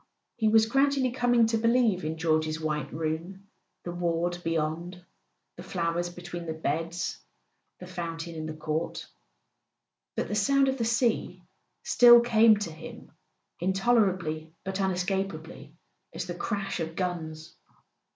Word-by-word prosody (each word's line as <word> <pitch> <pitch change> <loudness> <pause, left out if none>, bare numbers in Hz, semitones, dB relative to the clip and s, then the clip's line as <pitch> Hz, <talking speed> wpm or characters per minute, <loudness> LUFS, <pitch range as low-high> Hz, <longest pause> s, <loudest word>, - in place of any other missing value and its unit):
He 220 -2 +1
was 220 0 +5
gradually 270 +1 +2
coming 245 -2 +3
to 225 0 0
believe 230 -5 +2
in 160 +1 -3
George's 155 -1 0
white 150 -3 -2
room, 165 +5 -4 0.4
the 175 - -5
ward 175 0 -1
beyond, 165 +2 -2 0.5
the - - -8
flowers 175 -1 -2
between 175 -1 -8
the 160 - -3
beds, 165 +3 -2 0.6
the 180 - -9
fountain 170 -2 -5
in 160 -1 -5
the 155 - -6
court; 155 +1 -3 1.1
but - - -1
the - - -4
sound 275 +7 +3
of 265 0 -2
the 230 - +1
sea 235 0 0 0.4
still 240 -1 +8
came 225 -2 +5
to 205 -5 -4
him, 155 - -11 0.5
intolerably 185 -5 +1
but 190 0 -4
unescapably, 180 -5 -3 0.4
as 175 +1 -3
the 175 - -5
crash 195 +1 -3
of 165 0 -4
guns. 165 -3 -4
175 Hz, 135 wpm, -28 LUFS, 160-215 Hz, 1.1 s, still